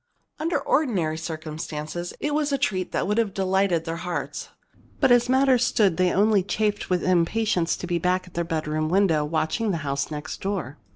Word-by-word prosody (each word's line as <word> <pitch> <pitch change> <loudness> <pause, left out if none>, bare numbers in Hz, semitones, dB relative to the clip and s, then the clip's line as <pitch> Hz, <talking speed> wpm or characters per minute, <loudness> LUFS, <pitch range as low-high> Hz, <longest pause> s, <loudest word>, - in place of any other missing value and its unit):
Under 330 +2 0
ordinary 195 - +1
circumstances 160 +1 -5
it 295 0 -1
was 295 -1 0
a 275 - +2
treat 190 -9 -1
that - - 0
would 210 +3 +1
have 215 -4 0
delighted 190 -3 +1
their 165 0 -3
hearts. 150 -4 -4 0.5
But, - - +4
as 245 0 +4
matters 260 -1 +4
stood, 200 -8 +2
they 185 -1 +3
only 205 0 +3
chafed 205 +2 -1
with 180 -1 +1
impatience 180 0 +1
to - - -6
be 175 -1 -1
back 180 +2 0
at 180 - -16
their 170 - -1
bedroom 155 -2 -2
window, 175 -5 +3
watching 160 +8 -1
the 180 - 0
house 140 0 -1
next 150 0 -6
door. 190 -9 -3
180 Hz, 185 wpm, -24 LUFS, 160-210 Hz, 0.5 s, But